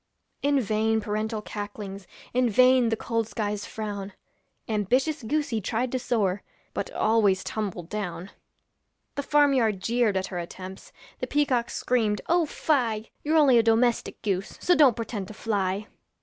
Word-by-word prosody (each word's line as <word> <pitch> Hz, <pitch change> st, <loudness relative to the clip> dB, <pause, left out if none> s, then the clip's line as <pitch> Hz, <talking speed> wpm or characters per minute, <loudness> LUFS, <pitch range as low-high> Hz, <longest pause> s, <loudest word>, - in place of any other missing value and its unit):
In 285 Hz, 0 st, +3 dB
vain 220 Hz, -1 st, +1 dB
parental 215 Hz, +1 st, -2 dB
cacklings, 205 Hz, -2 st, -7 dB, 0.3 s
In 250 Hz, 0 st, +3 dB
vain 255 Hz, +2 st, +5 dB
the 225 Hz, -, +1 dB
cold 230 Hz, 0 st, -2 dB
sky's 210 Hz, -1 st, -3 dB
frown, 205 Hz, -2 st, -5 dB, 0.5 s
Ambitious 250 Hz, +9 st, +1 dB
goosey 250 Hz, -2 st, -1 dB
tried 235 Hz, +5 st, -1 dB
to 255 Hz, -, -1 dB
soar, 205 Hz, -6 st, 0 dB, 0.3 s
But -, -, -3 dB
always 210 Hz, -4 st, +2 dB
tumbled 195 Hz, -6 st, -4 dB
down. 195 Hz, -3 st, -4 dB, 0.8 s
The 285 Hz, -, -2 dB
farm 290 Hz, 0 st, +4 dB
yard 220 Hz, -7 st, +2 dB
jeered 230 Hz, 0 st, +1 dB
at 190 Hz, -, -1 dB
her 175 Hz, -, -2 dB
attempts, 185 Hz, +2 st, -8 dB, 0.3 s
The -, -, -3 dB
peacocks 265 Hz, -5 st, +1 dB
screamed, 220 Hz, -4 st, +1 dB
'Oh 340 Hz, -1 st, +3 dB
fie! 230 Hz, -9 st, 0 dB
You're 310 Hz, +2 st, +2 dB
only 270 Hz, -6 st, +6 dB
a -, -, +6 dB
domestic 230 Hz, +1 st, +2 dB
goose, 195 Hz, -2 st, -2 dB
So 355 Hz, -, +3 dB
don't 285 Hz, -9 st, +6 dB
pretend 220 Hz, -4 st, -4 dB
to 215 Hz, -, -10 dB
fly.' 200 Hz, -2 st, -1 dB
220 Hz, 150 wpm, -26 LUFS, 205-250 Hz, 0.8 s, only